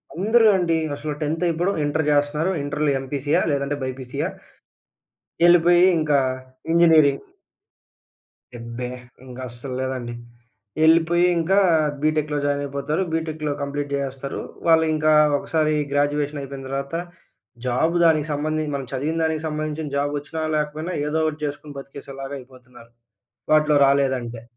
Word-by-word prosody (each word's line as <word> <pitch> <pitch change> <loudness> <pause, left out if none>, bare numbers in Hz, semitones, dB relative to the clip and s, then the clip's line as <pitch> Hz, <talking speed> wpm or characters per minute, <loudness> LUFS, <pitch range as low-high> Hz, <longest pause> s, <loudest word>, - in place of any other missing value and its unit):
అందరూ 220 +5 +4
అండి 170 -3 +1 0.2
అసలు 150 +1 -4
10త్ 160 +4 -1
ఇప్పుడు 175 +4 0
ఇంటర్ 155 +2 0
చేస్తున్నారు. 150 +5 +1
ఇంటర్‌లో 150 +1 0
ఎంపీసీయా! 145 +5 0
లేదంటే 140 0 -1
బీపీసీయా! 130 -1 -4 1.2
ఎళ్ళిపోయి 175 +1 +6
ఇంకా 150 -2 +2 0.5
ఇంజినీరింగ్. 160 -5 +5 1.3
యబ్బే! 115 +1 -6 0.4
ఇంక 125 -1 -11
అస్సలు 125 +2 -8
లేదండి. 130 -2 -3 0.7
ఎళ్ళిపోయి 165 +2 +4
ఇంకా 180 +4 +2 0.4
బీటెక్‌లో 155 -1 0
జాయిన్ 145 0 0
అయిపోతారు. 140 +5 -2
బీటెక్‌లో 155 -2 -2
కంప్లీట్ 140 0 -3
చేసేస్తారు. 135 0 -4 0.3
వాళ్ళు 160 -1 +5
ఇంకా 155 0 +2 0.3
ఒకసారి 155 0 0 0.2
గ్రాడ్యుయేషన్ 145 0 0
అయిపోయిన 135 -1 -8
తర్వాత 140 +3 -4 0.7
జాబు 160 +8 +1
దానికి 155 -2 +3
సంబంధించి 155 +1 -2
మనం 135 -2 -4
చదివిన 150 +5 -2
దానికి 160 -1 -1
సంబంధించిన 155 0 -3
జాబ్ 145 +1 0
వచ్చినా 160 +2 -6
లేకపోయినా 150 +3 -3
ఏదో 160 +2 0
ఒకటి 155 -1 -2
చేసుకొని 145 0 -6
బ్రతికేసేలాగా 135 0 -8
అయిపోతున్నారు, 125 -2 -16 0.6
వాటిల్లో 150 -1 +4
రాలేదంటే. 130 -4 0
145 Hz, 120 wpm, -22 LUFS, 140-160 Hz, 1.3 s, ఎళ్ళిపోయి